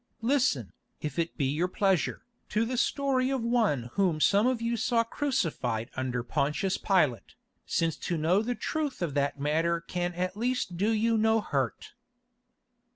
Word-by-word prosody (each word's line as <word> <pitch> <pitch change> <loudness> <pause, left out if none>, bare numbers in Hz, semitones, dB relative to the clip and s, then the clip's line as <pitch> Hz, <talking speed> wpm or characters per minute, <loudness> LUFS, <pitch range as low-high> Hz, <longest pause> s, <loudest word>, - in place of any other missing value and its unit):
Listen, 225 - +1 0.3
if 150 +1 -4
it 165 0 -2
be 140 - +1
your 150 +7 +1
pleasure, 190 -1 0 0.2
to 220 +2 +1
the 250 +2 -2
story 265 0 +1
of 265 -3 -1
One 210 - +1
whom 180 -6 +1
some 205 +8 +4
of 255 -2 +1
you 230 +1 -1
saw 230 0 +2
crucified 165 - -2
under 125 -2 -2
Pontius 150 +9 0
Pilate, 150 - +1 0.3
since 165 -2 0
to 175 - -2
know 170 +6 +3
the 245 +2 -2
truth 295 - -2
of 160 -5 -2
that 140 0 0
matter 165 +4 +1
can 175 +1 -3
at 185 +1 -2
least 240 -4 -1
do 200 +5 +1
you 225 0 +2
no 220 +1 +3
hurt." - - -2
185 Hz, 160 wpm, -29 LUFS, 150-230 Hz, 0.3 s, some